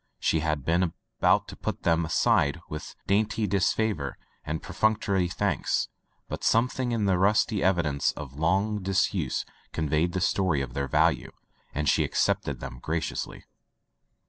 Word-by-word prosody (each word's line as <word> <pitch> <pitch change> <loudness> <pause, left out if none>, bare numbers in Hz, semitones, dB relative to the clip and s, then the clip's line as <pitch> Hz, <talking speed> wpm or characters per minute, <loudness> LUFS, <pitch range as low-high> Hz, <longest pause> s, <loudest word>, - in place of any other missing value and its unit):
She 80 - +2
had 75 -3 -1
been 85 0 +2 0.3
about - - +4
to - - -8
put - - -4
them 85 0 +2
aside 75 -1 +2
with 75 - -7
dainty 105 +2 +1
disfavor 100 - 0 0.3
and 80 +1 -4
perfunctory 100 -1 +1
thanks, 90 -1 0 0.4
but - - -6
something 125 +2 +2
in 115 -3 0
the 95 -2 +2
rusty 105 +1 +3
evidence 85 -7 +2
of 70 -3 -8
long 95 +8 +1
disuse 95 -6 0 0.3
conveyed 80 +3 0
the 95 - 0
story 90 -6 +2
of 65 -3 -5
their 70 +1 -2
value, - - +2 0.4
and 75 +1 -2
she - - +4
accepted - - 0
them 65 - -7
graciously. 80 +4 -3
90 Hz, 145 wpm, -27 LUFS, 75-100 Hz, 0.4 s, about